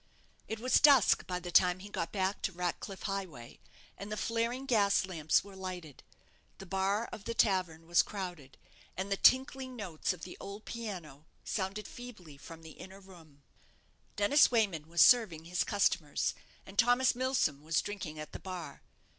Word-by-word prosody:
It 220 Hz, -, -4 dB
was 255 Hz, +3 st, +3 dB
dusk 280 Hz, -7 st, +5 dB
by 180 Hz, -1 st, -2 dB
the 180 Hz, -1 st, -7 dB
time 180 Hz, 0 st, +5 dB
he 190 Hz, +2 st, -10 dB
got 170 Hz, -4 st, -4 dB
back 190 Hz, 0 st, -1 dB
to -, -, -1 dB
Ratcliff 180 Hz, +2 st, -4 dB
Highway, 185 Hz, -, -5 dB, 0.4 s
and 200 Hz, +1 st, -8 dB
the 215 Hz, -, -3 dB
flaring 230 Hz, +5 st, -1 dB
gas 205 Hz, -7 st, +3 dB
lamps 160 Hz, -5 st, +1 dB
were 200 Hz, -1 st, -13 dB
lighted. 180 Hz, -6 st, -7 dB, 0.6 s
The 195 Hz, -, -10 dB
bar 195 Hz, +4 st, 0 dB
of 205 Hz, -, -9 dB
the 230 Hz, -, -3 dB
tavern 180 Hz, -7 st, +1 dB
was 170 Hz, +1 st, +4 dB
crowded, 175 Hz, -9 st, -7 dB, 0.4 s
and 190 Hz, +2 st, -4 dB
the 195 Hz, -, +1 dB
tinkling 260 Hz, +1 st, +3 dB
notes 185 Hz, -9 st, -3 dB
of 180 Hz, -2 st, -8 dB
the 180 Hz, -, -8 dB
old 200 Hz, +2 st, -9 dB
piano 175 Hz, -11 st, -7 dB, 0.2 s
sounded 200 Hz, +1 st, -3 dB
feebly 215 Hz, -, -11 dB
from 165 Hz, +4 st, -12 dB
the 160 Hz, -, -10 dB
inner 190 Hz, +1 st, -11 dB
room. 165 Hz, -7 st, -17 dB, 0.7 s
Dennis 205 Hz, +9 st, +5 dB
Wayman 195 Hz, -10 st, 0 dB
was 170 Hz, 0 st, +5 dB
serving 195 Hz, -10 st, +4 dB
his 180 Hz, +2 st, 0 dB
customers, 185 Hz, -7 st, 0 dB, 0.3 s
and 195 Hz, +1 st, -7 dB
Thomas 245 Hz, +2 st, +4 dB
Milsom 250 Hz, -, 0 dB
was 160 Hz, +1 st, 0 dB
drinking 185 Hz, -7 st, -6 dB
at 155 Hz, 0 st, -8 dB
the -, -, -8 dB
bar. 180 Hz, -6 st, -7 dB
190 Hz, 170 wpm, -32 LUFS, 170-215 Hz, 0.7 s, dusk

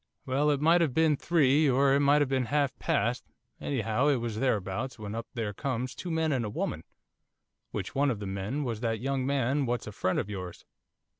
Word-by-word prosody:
'Well, 140 Hz, +3 st, +1 dB
it 145 Hz, -2 st, +2 dB
might 165 Hz, +3 st, +5 dB
have 150 Hz, -7 st, +1 dB
been 160 Hz, -2 st, +4 dB
three, 150 Hz, -1 st, +3 dB
or 135 Hz, +1 st, +4 dB
it 140 Hz, -, +4 dB
might 145 Hz, +1 st, +4 dB
have 135 Hz, -, -4 dB
been 130 Hz, -2 st, +1 dB
half 140 Hz, +1 st, 0 dB
past, 120 Hz, +4 st, 0 dB, 0.4 s
anyhow 120 Hz, 0 st, 0 dB
it 145 Hz, -, +4 dB
was 115 Hz, -3 st, -3 dB
thereabouts, 115 Hz, 0 st, -1 dB
when 105 Hz, -2 st, -6 dB
up 115 Hz, +1 st, -5 dB
there 110 Hz, -3 st, -2 dB
comes 125 Hz, +2 st, -3 dB
two 180 Hz, -, -7 dB
men 160 Hz, -1 st, 0 dB
and 130 Hz, -4 st, 0 dB
a 105 Hz, -, -3 dB
woman, -, -, -3 dB, 0.9 s
which -, -, -5 dB
one 140 Hz, +1 st, +2 dB
of 120 Hz, -, -1 dB
the 105 Hz, -, -5 dB
men 100 Hz, +9 st, -3 dB
was 115 Hz, -5 st, -3 dB
that 115 Hz, -2 st, -1 dB
young 135 Hz, +1 st, -1 dB
man 140 Hz, 0 st, +1 dB
what's 120 Hz, 0 st, -1 dB
a 105 Hz, -, -6 dB
friend 95 Hz, -2 st, -1 dB
of -, -, -1 dB
yours. 95 Hz, -4 st, -7 dB
130 Hz, 215 wpm, -29 LUFS, 115-145 Hz, 0.9 s, might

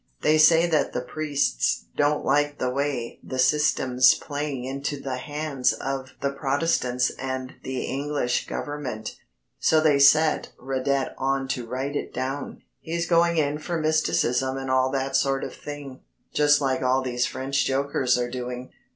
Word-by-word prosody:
They 155 Hz, 0 st, +4 dB
say 165 Hz, +2 st, +6 dB
that 160 Hz, -4 st, +1 dB
the 125 Hz, -, -1 dB
priests 140 Hz, -, -1 dB
don't 145 Hz, +1 st, +1 dB
like 145 Hz, +1 st, +2 dB
the 125 Hz, -, -1 dB
way 135 Hz, -3 st, -2 dB
the 130 Hz, -, -6 dB
Système's 130 Hz, -2 st, +4 dB
playing 145 Hz, -3 st, -4 dB
into 140 Hz, +2 st, -3 dB
the 130 Hz, -2 st, -4 dB
hands 145 Hz, -1 st, -1 dB
of 135 Hz, -1 st, -4 dB
the 140 Hz, 0 st, 0 dB
Protestants 135 Hz, -3 st, 0 dB
and 130 Hz, 0 st, -4 dB
the 130 Hz, -1 st, -4 dB
English 140 Hz, -3 st, -1 dB
Government. 135 Hz, -7 st, -5 dB, 0.4 s
So 160 Hz, -, +4 dB
they 155 Hz, -3 st, +3 dB
set 155 Hz, +3 st, +4 dB
Radet 135 Hz, +1 st, -1 dB
on 135 Hz, 0 st, 0 dB
to 125 Hz, -3 st, -3 dB
write 130 Hz, +4 st, -3 dB
it -, -, -3 dB
down. 135 Hz, +3 st, -4 dB, 0.2 s
He's 170 Hz, +1 st, -3 dB
going 170 Hz, 0 st, +3 dB
in 150 Hz, -1 st, +1 dB
for 170 Hz, +1 st, -3 dB
mysticism 130 Hz, -, +1 dB
and 135 Hz, -1 st, -3 dB
all 130 Hz, 0 st, +3 dB
that 135 Hz, 0 st, -2 dB
sort 135 Hz, 0 st, +1 dB
of -, -, -5 dB
thing 145 Hz, -3 st, -8 dB, 0.3 s
just 145 Hz, 0 st, +4 dB
like 130 Hz, -2 st, 0 dB
all 130 Hz, +1 st, +2 dB
these 125 Hz, -1 st, 0 dB
French 135 Hz, +1 st, -1 dB
jokers 135 Hz, -2 st, +1 dB
are 120 Hz, 0 st, -1 dB
doing. 125 Hz, 0 st, -5 dB
135 Hz, 160 wpm, -25 LUFS, 130-145 Hz, 0.4 s, say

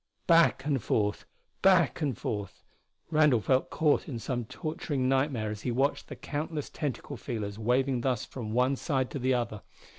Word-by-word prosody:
Back 165 Hz, -5 st, +4 dB
and 140 Hz, -4 st, +1 dB
forth 105 Hz, -1 st, 0 dB, 0.4 s
back 185 Hz, -3 st, +4 dB
and 140 Hz, -7 st, 0 dB
forth 100 Hz, -3 st, -5 dB, 0.5 s
Randall 150 Hz, -6 st, +5 dB
felt 130 Hz, +5 st, +1 dB
caught 150 Hz, -2 st, +2 dB
in 125 Hz, -, -4 dB
some 120 Hz, +1 st, -3 dB
torturing 155 Hz, -2 st, -3 dB
nightmare 130 Hz, -5 st, +1 dB
as 105 Hz, -1 st, -6 dB
he 125 Hz, -, -2 dB
watched 135 Hz, +4 st, 0 dB
the -, -, -7 dB
countless 150 Hz, 0 st, -4 dB
tentacle 145 Hz, -1 st, -4 dB
feelers 110 Hz, -4 st, -5 dB
waving 125 Hz, +2 st, +1 dB
thus 125 Hz, -3 st, 0 dB
from 115 Hz, -5 st, -6 dB
one 125 Hz, +4 st, +2 dB
side 130 Hz, -2 st, -1 dB
to 140 Hz, -, -4 dB
the 130 Hz, 0 st, +2 dB
other. 115 Hz, -4 st, -2 dB
130 Hz, 170 wpm, -29 LUFS, 115-145 Hz, 0.5 s, Randall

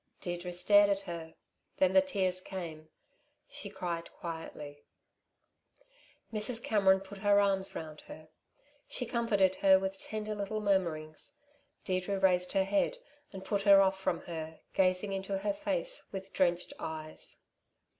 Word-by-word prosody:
Deirdre 175 Hz, 0 st, -4 dB
stared 205 Hz, +3 st, +5 dB
at 200 Hz, 0 st, +1 dB
her; 170 Hz, -4 st, -7 dB, 0.4 s
then 190 Hz, 0 st, +3 dB
the 285 Hz, -, +7 dB
tears 190 Hz, -10 st, -1 dB
came; 165 Hz, -5 st, -7 dB, 0.6 s
she 200 Hz, -, -6 dB
cried 175 Hz, -4 st, -4 dB
quietly. 150 Hz, -3 st, -7 dB, 1.5 s
Mrs. 225 Hz, +2 st, +1 dB
Cameron 190 Hz, -3 st, +4 dB
put 195 Hz, +1 st, -10 dB
her 205 Hz, 0 st, +4 dB
arms 195 Hz, -1 st, +1 dB
round 155 Hz, -1 st, -7 dB
her. 155 Hz, 0 st, -11 dB, 0.6 s
She 250 Hz, -, -3 dB
comforted 215 Hz, -6 st, +2 dB
her 190 Hz, -1 st, +6 dB
with 190 Hz, 0 st, -3 dB
tender 215 Hz, 0 st, -4 dB
little 205 Hz, +1 st, -3 dB
murmurings. 170 Hz, -7 st, -1 dB, 0.5 s
Deirdre 185 Hz, +1 st, -1 dB
raised 180 Hz, -2 st, +2 dB
her 195 Hz, -, +3 dB
head, 200 Hz, -, +1 dB, 0.3 s
and 190 Hz, -1 st, -9 dB
put 200 Hz, -1 st, 0 dB
her 200 Hz, -1 st, +7 dB
off 190 Hz, 0 st, +3 dB
from 180 Hz, -3 st, -1 dB
her, 160 Hz, -2 st, -7 dB
gazing 185 Hz, +1 st, +2 dB
into 195 Hz, 0 st, -2 dB
her 200 Hz, +1 st, -1 dB
face 305 Hz, -, -1 dB
with 195 Hz, 0 st, -7 dB
drenched 175 Hz, -2 st, +1 dB
eyes. 155 Hz, -1 st, -4 dB
190 Hz, 140 wpm, -32 LUFS, 175-200 Hz, 1.5 s, the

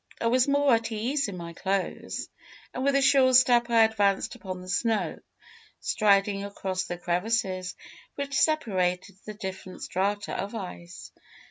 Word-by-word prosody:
I -, -, -3 dB
was 250 Hz, +3 st, +3 dB
more 285 Hz, -1 st, +3 dB
at 230 Hz, 0 st, +1 dB
ease 245 Hz, +6 st, -1 dB
in 195 Hz, -3 st, -6 dB
my 170 Hz, -1 st, -7 dB
clothes, 190 Hz, +2 st, -3 dB, 0.5 s
and 255 Hz, -, -3 dB
with 280 Hz, 0 st, +2 dB
a 275 Hz, -, +3 dB
sure 265 Hz, -2 st, +5 dB
step 240 Hz, -1 st, +5 dB
I 230 Hz, -1 st, +6 dB
advanced 205 Hz, -3 st, +1 dB
upon 185 Hz, -2 st, -7 dB
the 180 Hz, -, -11 dB
snow, 220 Hz, +4 st, 0 dB, 0.6 s
striding 200 Hz, -2 st, +2 dB
across 190 Hz, -2 st, -3 dB
the 175 Hz, -2 st, -5 dB
crevasses 185 Hz, +1 st, -1 dB, 0.4 s
which 280 Hz, 0 st, -4 dB
separated 190 Hz, -, +1 dB
the 215 Hz, -, -6 dB
different 190 Hz, -2 st, -7 dB
strata 200 Hz, +2 st, -1 dB
of 200 Hz, +4 st, -4 dB
ice. 180 Hz, -4 st, -8 dB
205 Hz, 150 wpm, -27 LUFS, 185-240 Hz, 0.6 s, I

